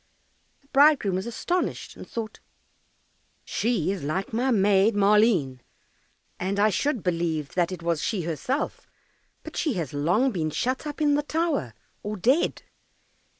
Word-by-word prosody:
The - - -29
bridegroom 280 -8 +4
was 190 +4 -2
astonished, 350 +10 -2
and - - -11
thought, 225 -2 -5 1.1
"She 215 -7 0
is 195 - -4
like 180 +9 -3
my 245 +4 +1
Maid 205 -1 +3
Maleen, 200 - +3 0.8
and 195 +2 -1
I 210 +1 +4
should 270 -1 -1
believe 165 -4 -1
that 175 0 +1
it 180 -2 -6
was 170 -2 0
she 195 -6 -1
herself, 170 - -3 0.6
but - - -9
she 305 -5 0
has 165 - -4
long 175 - +2
been 160 -7 -1
shut 255 - -2
up 295 +1 -6
in 295 -1 +4
the 290 - +2
tower, 300 - -1 0.3
or 210 +1 -4
dead." 255 - +1
205 Hz, 150 wpm, -26 LUFS, 170-260 Hz, 1.1 s, bridegroom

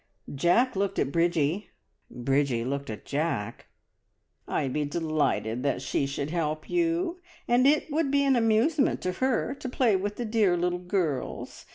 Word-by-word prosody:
Jack 175 - +2
looked 195 0 -1
at 135 - 0
Bridgie; 170 +2 +1 0.4
Bridgie 130 -1 0
looked 140 +1 -3
at 110 - -7
Jack. 145 -8 -2 0.8
"I'd 130 -2 -1
be 150 - 0
delighted 150 -6 -1
that 135 -1 -1
she 135 +1 0
should 140 +2 -4
help 155 -2 -2
you, 345 +1 0 0.3
and 245 +2 +4
it 300 +1 +2
would 300 -1 +1
be 280 0 +3
an 275 -1 +3
amusement 240 +6 +2
to 185 - -1
her 260 +5 0
to 270 -2 -6
play 245 -4 +2
with 205 +2 -2
the 240 - -4
dear 215 -5 +2
little 180 +1 0
girls. 175 -7 -3
180 Hz, 160 wpm, -27 LUFS, -, 0.8 s, and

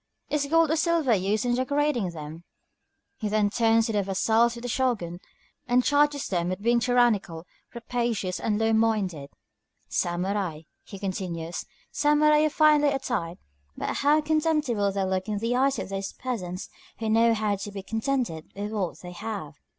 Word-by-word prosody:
Is 290 -1 0
gold 325 +1 +3
or - - +3
silver 320 -5 +2
used 205 +3 0
in 245 - +1
decorating 260 -4 0
them?" 160 0 -8 0.7
He 215 -5 -3
then 210 -1 +2
turns 225 0 +3
to 225 - -1
the 205 - +2
vassals 220 +5 +2
of 235 - -9
the - - -3
Shōgun, 230 -9 -1 0.5
and 250 0 +3
charges 290 0 +2
them 175 -2 -1
with 185 +1 -3
being 235 +3 +2
tyrannical, 235 -9 +1 0.3
rapacious, 235 -6 -2
and 210 -2 0
low 225 +1 +2
minded. 205 -10 0 0.6
"Samurai," 175 -2 -1 0.2
he 200 - -10
continues, 180 -4 -4 0.3
"samurai 300 0 +4
are - - +2
finely 300 -1 +4
attired, 240 -11 -2 0.4
but - - -2
how 295 +2 +3
contemptible 300 -9 +1
they 195 0 -1
look 190 +1 -1
in 210 -1 -2
the 230 +4 -1
eyes 270 +2 +2
of - - -5
those 195 0 -4
peasants 185 -7 -5 0.3
who 225 - -3
know 230 +1 +4
how 210 -1 0
to 205 +1 -6
be 195 -1 -7
contented 225 - -2
with 205 +1 -4
what 195 -5 -3
they 180 - -8
have!" 200 -4 -6
220 Hz, 165 wpm, -26 LUFS, 190-255 Hz, 0.7 s, samurai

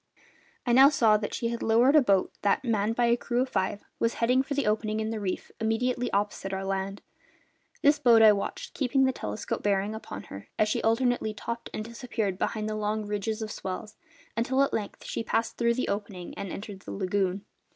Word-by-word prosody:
I 240 - +2
now 265 +3 +9
saw 225 -7 +4
that 210 0 -4
she 230 - -2
had 235 0 -4
lowered 240 +6 +4
a 305 - +8
boat 195 -7 +2
that, 205 +5 +2
manned 220 -1 +1
by 240 - +2
a 235 0 +4
crew 245 +1 0
of 260 - -6
five, 195 0 -1 0.2
was 230 - +1
heading 250 +3 +3
for 280 +1 -4
the 285 - 0
opening 215 0 0
in 220 0 -2
the 225 - -3
reef 190 -3 -4
immediately 240 +3 0
opposite 200 -1 -1
our 190 - -2
island. 195 +1 -3 0.8
This 290 +1 +5
boat 235 -5 +6
I 215 - +9
watched, 200 -1 -3
keeping 270 0 +2
the 260 - +3
telescope 105 - -4
bearing 200 +1 +1
upon 100 - -7
her 100 +1 -10
as 215 - +3
she - - 0
alternately 230 -1 +1
topped 235 +2 -5
and 215 - -4
disappeared 230 -5 -3
behind 215 -1 -1
the 215 - -2
long 215 0 -1
ridges 210 +2 -2
of 215 - -5
swell, 190 +2 -5 0.4
until 260 +4 +2
at 275 - -1
length 210 -2 -4
she - - -3
passed 225 +1 -1
through 235 0 +2
the 255 - -1
opening 200 -3 -4
and 200 -3 -5
entered 200 -1 -7
the - - -9
lagoon. 195 0 -1
220 Hz, 210 wpm, -28 LUFS, 200-240 Hz, 0.8 s, now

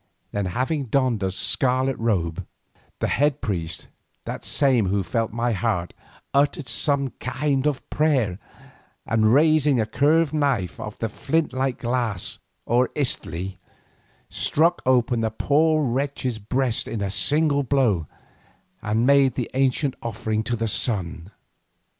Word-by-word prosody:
Then, 100 -2 -2
having 130 - -1
donned 125 -3 +1
a 95 -1 0
scarlet 130 +6 +1
cloak, 90 -8 0 0.6
the - - -1
head 145 +1 +1
priest, 90 -6 -4 0.4
that - - -6
same 130 -8 +2
who 100 +2 0
had 95 - -1
felt 115 +6 -1
my 120 +2 -1
heart, 100 -5 -1 0.4
uttered 140 0 +1
some 140 +2 0
kind 135 +2 -1
of 145 -3 -2
prayer, 130 - +1 0.7
and, 110 -1 +2
raising 150 -1 +4
a 110 - +1
curved 150 +7 +2
knife 135 - 0
of 105 - -7
the 115 - -2
flint 145 +7 -1
like 130 -1 -1
glass 120 -6 -2 0.3
or 120 +2 +2
itztli, 95 - -2 0.7
struck 170 +3 +1
open 125 -2 +2
the 110 - +1
poor 155 +6 +2
wretch's 130 -2 -2
breast 125 +3 -1
at 115 - -4
a 100 - -2
single 145 +8 +3
blow, 120 - +1 0.7
and 110 +3 0
made 140 -2 +4
the 125 - -3
ancient 135 +1 +1
offering 110 -1 -2
to 120 - -1
the 115 0 -2
sun. 95 -6 -1
125 Hz, 140 wpm, -23 LUFS, 110-140 Hz, 0.7 s, raising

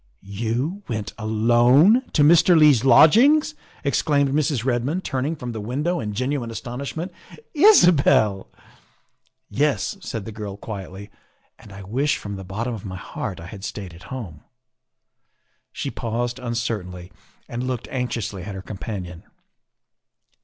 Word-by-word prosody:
' - - -39
' - - -42 0.2
You 130 - -2
went, 110 -4 -4
alone, 120 - +4
to 150 - +4
Mr. 170 +3 +6
Leigh 150 -2 +7
's 120 -2 -1
lodgings! 270 - +6 0.2
" - - -27
ex 140 - +1
claimed 140 -3 +2
Mrs. 140 -4 0
Redmond, 135 +8 -1
turning 135 +4 -2
from 125 -5 -6
the 110 -2 -5
window 145 +11 -2
in 105 -2 -4
genuine 130 0 -2
astonishment. 140 +9 -5 0.3
" 455 - -23
Isabel!" 175 - +5 0.5
" - - -48 0.3
Yes," 150 - 0
said 115 - -5
the 110 - -6
girl 105 -2 -7
quietly, 100 -1 -8 0.2
" - - -42
and 105 - -15
I 100 0 -10
wish 135 +9 0
from 100 -1 -7
the 95 - -7
bottom 110 +6 -4
of 110 - -7
my 95 -2 -6
heart - - -6
I 85 - -9
had 95 +2 -10
stayed 100 -4 -6
at 85 - -14
home. 105 - -7 0.5
' - - -57
' - - -47
She - - -4
paused 120 +2 -3
uncertainly 110 -7 -4 0.4
and 120 +2 -4
looked 130 -2 -4
anxiously 120 -6 -3
at 100 +2 -7
her 95 - -7
companion. 95 -3 -7
120 Hz, 165 wpm, -22 LUFS, 100-145 Hz, 0.5 s, Leigh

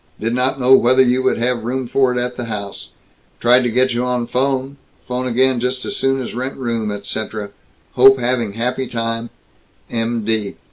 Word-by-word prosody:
Did 115 +2 -1
not 130 +2 +1
know 130 +1 +5
whether 130 0 +5
you 125 +1 +2
would 130 - +1
have 120 -1 -1
room 130 +2 -2
for 130 +1 +2
it 125 - -2
at 125 0 -3
house. 100 -3 -6 0.5
Tried 125 +2 +5
to 120 - 0
get 125 +2 +2
you 120 +1 -1
on 125 -1 -1
phone, 135 +2 -1 0.3
phone 125 +1 -2
again 130 +1 +2
just 125 +1 -2
as 205 - -3
soon 135 -4 +1
as 125 - -5
rent 130 +3 -4
room 115 -4 -2
etc. 105 0 -5 0.4
Hope 135 +2 +6
having 120 -4 -1
happy 125 +4 -2
time, 115 0 -3 0.6
M.D." 115 -3 -1
125 Hz, 180 wpm, -18 LUFS, 115-130 Hz, 0.6 s, Hope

